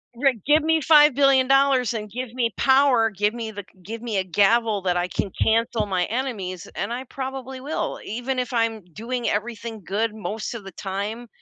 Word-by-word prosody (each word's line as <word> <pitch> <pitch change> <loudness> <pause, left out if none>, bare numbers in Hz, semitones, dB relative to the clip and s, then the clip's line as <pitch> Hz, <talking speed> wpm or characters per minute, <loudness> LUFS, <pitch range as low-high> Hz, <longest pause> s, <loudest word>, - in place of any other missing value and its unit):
Right, 250 -4 +1
give 300 +2 +5
me 320 0 +2
$5,000,000,000 275 -4 +5
and 210 -2 -5
give 245 +1 -5
me 235 -3 0
power, 265 -4 +4
give 210 +1 0
me 230 -2 -5
the 205 -1 -7 0.2
give 225 +5 -7
me 225 -4 -2
a 190 - 0
gavel 205 +3 +2
that 180 -1 0
I 175 +1 0
can 190 +2 -3
cancel 225 -1 +2
my 185 -3 0
enemies, 210 -8 -4
and 200 +3 -3
I 250 +2 -4
probably 265 0 -6
will, 290 +4 -3
even 245 +4 -3
if 250 0 -2
I'm 230 -3 0
doing 240 +3 -3
everything 220 0 -4
good 215 +2 -1
most 220 +1 -5
of 215 -4 -8
the 195 - -8
time. 205 +6 -4
230 Hz, 185 wpm, -23 LUFS, 210-260 Hz, 0.2 s, give